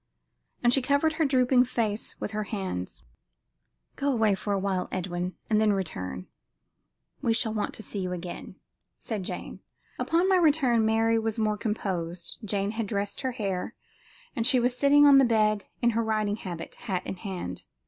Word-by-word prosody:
And 240 0 +5
she 270 - +4
covered 285 +4 +2
her 320 0 +1
drooping 255 -2 +4
face 225 -3 -2
with - - -4
her 215 0 -2
hands. 190 - -4 0.9
"Go 280 0 0
away 220 -5 +3
for 200 +2 -3
awhile, 195 -2 0
Edwin, 180 0 -3
and 215 -1 +3
then 215 -1 +4
return; 95 - -4 1.0
we 230 - +2
shall 225 -1 0
want 210 -1 -2
to 220 - -8
see 205 - -5
you 185 -1 -2
again," 180 0 -6 0.4
said 215 -4 -4
Jane. 180 - -6 0.4
Upon 340 +3 +2
my 380 -1 +5
return 285 -9 +3
Mary 225 +1 +3
was 225 0 -2
more 215 -1 +1
composed. 185 -5 -3
Jane 200 -1 -1
had 220 -1 -3
dressed 200 -1 -2
her 260 -2 -2
hair, 195 -6 -3 0.6
and 230 0 +1
she 255 - +5
was 245 +1 +1
sitting 285 +2 +5
on 280 -1 +8
the - - +6
bed 215 -3 +2 0.2
in 235 - +5
her 230 +1 0
riding 215 -2 0
habit, 175 -5 -7
hat 190 -5 -4
in 190 - -5
hand. 180 - -6
215 Hz, 175 wpm, -27 LUFS, 195-245 Hz, 1.0 s, on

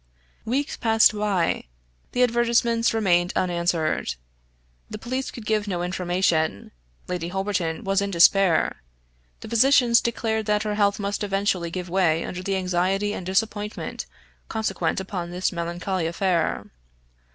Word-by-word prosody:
Weeks 275 +6 -1
passed 225 -1 +4
by. 205 -5 0 0.5
The 250 - +3
advertisements 235 -1 +2
remained 180 -5 +2
unanswered. 170 -3 0 0.7
The - - -6
police 255 +4 -3
could 230 - -9
give 215 -1 0
no 175 -3 -2
information. 175 - 0 0.4
Lady 175 -2 -3
Holberton 185 -3 -2
was 195 0 +1
in 200 - -1
despair; 180 - +4 0.6
the - - -8
physicians 235 +1 +4
declared 220 -2 -2
that 210 0 +1
her 210 -1 -2
health 205 -1 +1
must 205 +1 -2
eventually 195 -3 0
give 180 +1 -5
way 170 -3 +1
under 180 - -5
the 195 +1 -1
anxiety 190 +3 0
and 185 - -6
disappointment 210 +2 -2 0.4
consequent 220 -2 -1
upon 185 -2 -5
this 180 +1 -1
melancholy 175 0 -2
affair. 170 -1 0
195 Hz, 130 wpm, -24 LUFS, 175-215 Hz, 0.7 s, passed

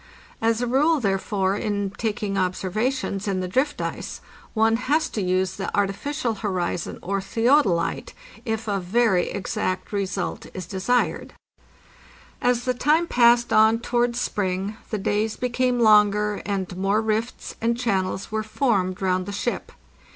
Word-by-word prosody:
As 230 +1 +1
a - - +2
rule, 290 +6 +3
therefore, 195 -2 0
in 205 -2 -2
taking 210 -2 -2
observations 195 +4 -1
in 195 -2 0
the 185 - -2
drift 265 +10 0
ice, - - -4 0.4
one 225 +1 +3
has 295 +6 +1
to 215 - -3
use 185 0 0
the - - -3
artificial 230 +6 -1
horizon 180 -4 -2
or 195 +2 -1
theodolite, 225 - +1 0.3
if 225 -2 -3
a 200 -1 0
very 190 0 +2
exact 185 0 -3
result 200 -1 -2
is 185 -2 -5
desired. 195 +7 -1 1.1
As 245 -1 +2
the 255 - +1
time 300 +7 +2
passed 240 -4 +4
on 220 +1 +6
towards 240 +1 0
spring 195 -1 -2
the 215 - -1
days 210 +2 0
became 250 0 0
longer, 210 -2 +4
and 190 -3 -2
more 195 +3 +1
rifts 220 +2 -2
and 230 +1 +1
channels 195 -6 -1
were 220 0 0
formed 205 -5 0
round 185 0 +1
the - - -4
ship. 200 - -3
210 Hz, 145 wpm, -24 LUFS, 195-240 Hz, 1.1 s, on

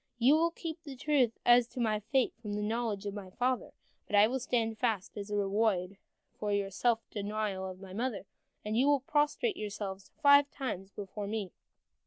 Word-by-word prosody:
You 245 +4 +5
will 330 +2 +3
keep 330 -1 -6
the 285 -4 -8
truth 260 -4 +2
as 240 0 +6
to 255 - -8
my 215 -3 +1
fate 255 +4 +1
from 210 -3 -5
the 210 0 -2
knowledge 220 -2 -2
of 200 - -3
my 200 -2 -7
father, 250 +5 -1 0.4
but - - -1
I 205 +1 +8
will 255 +4 -1
stand 225 -3 -1
fast 220 -6 -1
as 205 -1 -6
a 210 - -2
reward 200 -2 +1 0.4
for 210 -1 -1
the 200 -1 0
self 230 +3 +1
denial 205 -2 -2
of 185 0 -9
my 190 -1 -10
mother, 230 -1 -2 0.4
and 215 +1 -1
you 255 +4 +3
will 290 -2 +4
prostrate 300 - +1
yourselves 200 -2 -5
five 285 0 +7
times 195 -10 -5
before 200 +1 -6
me." 205 -3 -3
220 Hz, 195 wpm, -32 LUFS, 200-255 Hz, 0.4 s, I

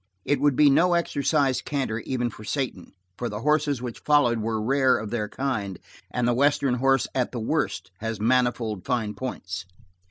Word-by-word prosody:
It 145 -2 +1
would 145 -2 +3
be 150 - +6
no 175 +5 +4
exercise 145 -4 +1
canter 135 -6 -2
even 120 0 -2
for 105 - -12
Satan, 125 -7 -3 0.3
for 120 - -2
the 105 0 -5
horses 150 -3 +1
which 120 -2 -5
followed 125 -6 +3
were 110 0 -1
rare 130 +3 +3
of 110 -1 -6
their 105 -3 -2
kind, 105 -9 -3 0.3
and 125 -1 -1
the 120 - +3
western 140 0 +2
horse 135 +1 +2
at 125 -2 0
the 120 - -4
worst 140 -5 -2
has 115 -1 -4
manifold 120 -3 +1
fine 115 -5 -1
points. 95 -8 -5
125 Hz, 180 wpm, -25 LUFS, 110-140 Hz, 0.3 s, be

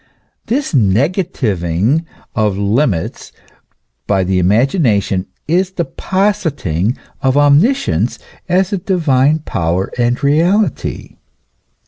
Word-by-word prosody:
This 265 +1 -1
negativing 115 - +1 0.3
of 105 -4 +1
limits 100 - -1 0.8
by 95 -2 +2
the 95 0 0
imagination 105 - +1 0.2
is 180 +4 +1
the 170 -2 -2
positing 150 - -1 0.2
of 130 +1 +1
omniscience 145 - +2 0.3
as 185 +2 +1
a 195 - 0
divine 155 -5 +1
power 85 +2 -1
and 120 +3 0
reality. 170 +9 0
135 Hz, 90 wpm, -15 LUFS, -, 0.8 s, by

